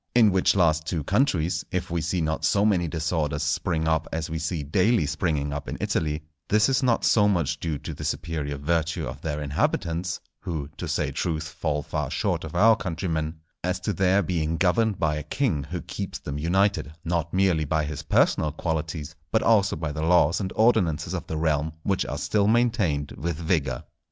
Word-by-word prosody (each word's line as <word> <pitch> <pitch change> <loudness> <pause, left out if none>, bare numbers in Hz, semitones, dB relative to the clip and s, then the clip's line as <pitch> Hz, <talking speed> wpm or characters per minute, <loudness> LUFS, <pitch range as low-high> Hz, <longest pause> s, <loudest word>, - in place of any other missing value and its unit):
In 110 -4 +6
which 95 +1 +3
last 80 -4 +2
two 80 -5 -1
countries, 90 - +1
if 90 -2 -3
we 85 -1 0
see 85 +2 -1
not 80 0 -1
so 100 +6 +3
many 90 -5 +2
disorders 80 -2 -1
spring 80 -1 0
up 80 0 +1
as 80 0 -3
we 80 - -2
see 80 -1 -2
daily 95 +6 +2
springing 75 -2 -1
up 70 -1 -5
in - - -4
Italy, 75 0 -1 0.3
this 105 +4 +4
is 135 +1 +2
not 125 -3 +2
so 105 -2 +5
much 85 -9 0
due 80 -3 -2
to - - -7
the - - -8
superior 75 -3 -3
virtue 80 +2 0
of 65 +2 -7
their 75 -2 -3
inhabitants 85 +4 -1 0.2
(who, 80 -6 -4
to - - -4
say - - -1
truth, 80 -2 -2
fall 75 -1 -2
far 75 -2 -3
short - - -1
of - - -7
our 110 +1 +6
countrymen), 80 -4 -2 0.3
as 90 +1 -1
to 105 +3 -1
their 95 +1 +3
being 80 -2 -1
governed 100 +3 +2
by 75 -3 0
a - - -3
king 75 - -1
who 85 +4 -5
keeps - - -5
them 75 0 -5
united, 95 -1 +1
not 85 -2 -1
merely 95 -4 +2
by 75 +1 0
his 75 0 -5
personal 75 -1 +2
qualities, 80 -1 -3 0.2
but 110 - +2
also 105 -3 +4
by 80 -1 -3
the 75 +1 -4
laws 85 +3 +3
and 95 -1 -3
ordinances 90 -7 +2
of 90 - -4
the 80 - -3
realm 80 -1 0
which 95 -2 0
are 70 - -3
still 100 +7 +1
maintained 110 - +2
with 85 +1 -2
vigour. 80 -7 -1
80 Hz, 195 wpm, -25 LUFS, 75-95 Hz, 0.3 s, In